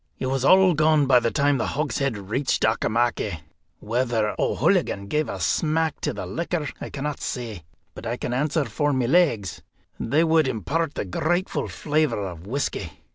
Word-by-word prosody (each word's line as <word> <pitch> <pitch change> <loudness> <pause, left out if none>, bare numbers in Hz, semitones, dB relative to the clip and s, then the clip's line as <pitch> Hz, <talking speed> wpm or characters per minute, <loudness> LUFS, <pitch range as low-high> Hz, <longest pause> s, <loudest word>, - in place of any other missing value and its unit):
It - - -3
was 130 0 -1
all 185 +4 +6
gone 155 -1 +3
by 130 -2 +6
the 115 - 0
time 140 +1 +2
the - - 0
hogshead 140 -4 -1
reached 110 +8 -1
Auchimachie. 110 -5 0 0.4
Whether 115 -1 0
O'Hooligan 100 - +1
gave 150 +9 -1
a - - -4
smack 160 0 0
to - - 0
the - - -5
liquor 170 -2 -2
I - - -5
cannot 145 +1 -4
say, 110 -10 -5 0.3
but - - -8
I 120 +2 -2
can 120 - -3
answer 150 +3 0
for 145 0 0
my 130 -2 +1
legs, 130 - +2 0.4
they 145 +7 +2
would 160 -3 +3
impart 140 - -2
a - - -2
grateful 175 - -1
flavour 150 -9 0
of 85 0 -9
whisky. 140 +6 -3
135 Hz, 170 wpm, -24 LUFS, 115-155 Hz, 0.4 s, all